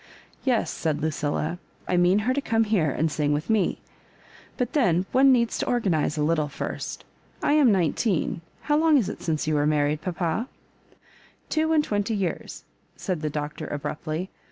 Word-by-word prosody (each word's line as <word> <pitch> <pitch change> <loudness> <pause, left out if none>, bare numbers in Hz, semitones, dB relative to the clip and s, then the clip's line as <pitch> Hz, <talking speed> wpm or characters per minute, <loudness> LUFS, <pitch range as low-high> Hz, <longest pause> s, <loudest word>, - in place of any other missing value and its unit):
"Yes," 250 -4 +1
said 155 -3 -1
Lucilla, 155 +2 -2 0.3
*'I 180 - +1
mean 180 +3 +4
her 255 - +2
to 285 - -1
como 225 -3 +1
here 190 -8 +2
and 155 +3 0
sing 145 -1 0
with 150 +8 -1
me; 215 -3 +1 0.8
but, 250 -3 -2
then, 185 - +2
one 270 +1 +6
needs 235 -3 +2
to - - -2
organise 175 -11 +1
a 150 - +1
little 155 -1 +1
first. 140 - -5 0.4
I - - +3
am 290 -6 +5
nineteen 180 -1 0
— - - -34
how 295 0 +2
long 315 -1 +5
is 235 - +1
it - - -7
since 160 -3 -1
you 155 - 0
were 145 0 +2
married, 150 0 +1
papa 180 +5 -2 0.3
?" - - -33
*' - - -30
Two 315 0 +1
and 310 -2 +4
twenty 210 -2 -1
years,'' 190 -4 -3 0.3
said 180 -6 -3
the 155 - -1
Doctor, 150 +1 -5
ab 145 -1 -4
ruptly. 160 +4 -4
175 Hz, 190 wpm, -25 LUFS, 155-235 Hz, 0.8 s, one